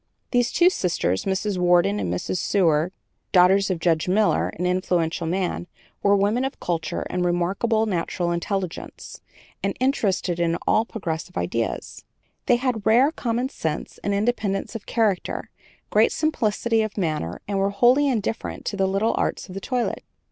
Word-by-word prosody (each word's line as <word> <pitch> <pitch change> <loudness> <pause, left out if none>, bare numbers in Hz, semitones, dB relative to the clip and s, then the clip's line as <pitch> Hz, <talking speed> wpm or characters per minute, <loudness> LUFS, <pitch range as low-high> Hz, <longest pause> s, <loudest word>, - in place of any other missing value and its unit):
'" - - -49
These 245 -1 +2
two 355 +1 +5
sisters, 165 - -1
Mrs. 195 0 -1
Worden 175 - +3
and 90 -4 -2
Mrs. 90 - -2
Seward, 170 -3 +2 0.4
daughters 190 +2 +5
of 185 - 0
Judge 165 -1 +1
Miller, 205 +3 +2
an 180 - -2
influential 180 -2 0
man, 180 0 -2 0.3
were 200 0 +4
women 205 +5 +2
of 270 - -4
culture 165 -3 -2
and 180 0 0
remarkable 195 +6 +1
natural 175 -3 -1
intelligence, 180 +1 -4 0.4
and - - -2
interested 200 -9 0
in 170 0 +1
all 220 - +3
progressive 165 - -5
ideas. 90 +6 -3 0.4
They 245 - +5
had 240 -3 -1
rare 240 +7 +5
common 245 -3 -2
sense 160 - -4
and 200 - 0
independence 200 -2 -1
of 225 -3 -7
character, 215 -6 -1 0.4
great - - +4
simplicity 230 -6 +1
of 215 -1 -3
manner, 155 - -2
and 200 -1 -1
were 195 +1 +2
wholly 245 +8 +4
indifferent 225 -3 -2
to - - -2
the 195 -1 +1
little 195 +4 +1
arts - - -2
of - - -8
the 195 - -6
toilet. 250 +1 -2
195 Hz, 160 wpm, -24 LUFS, 175-225 Hz, 0.4 s, two